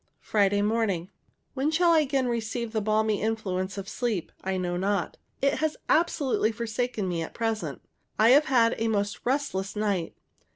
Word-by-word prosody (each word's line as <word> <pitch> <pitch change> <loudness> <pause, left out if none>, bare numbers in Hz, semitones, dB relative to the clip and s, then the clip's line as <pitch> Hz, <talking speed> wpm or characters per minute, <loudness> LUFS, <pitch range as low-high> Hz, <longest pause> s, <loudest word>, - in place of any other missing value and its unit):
Friday 205 -1 +2
morning. 205 -5 0 0.4
When 270 +2 -1
I - - +4
shall 335 +2 +4
again 280 -4 +2
receive 235 0 -2
the 220 -1 -1
balmy 215 0 +1
influence 195 -3 -2
of 195 -1 -5
sleep, 220 -8 -2
I 190 0 -1
know 175 -1 -2
not. 195 0 -1 0.3
It 275 - +2
has 315 -1 0
absolutely 290 -9 +2
forsaken 230 -2 -2
me 170 -2 -1
at 165 - -6
present. 225 -2 -2 0.3
I 220 +2 +5
have 285 +4 +6
had 235 -5 +4
a 225 - +1
most 205 -2 -1
restless 250 -8 -1
night. 200 -5 -1
220 Hz, 165 wpm, -27 LUFS, 195-250 Hz, 0.4 s, have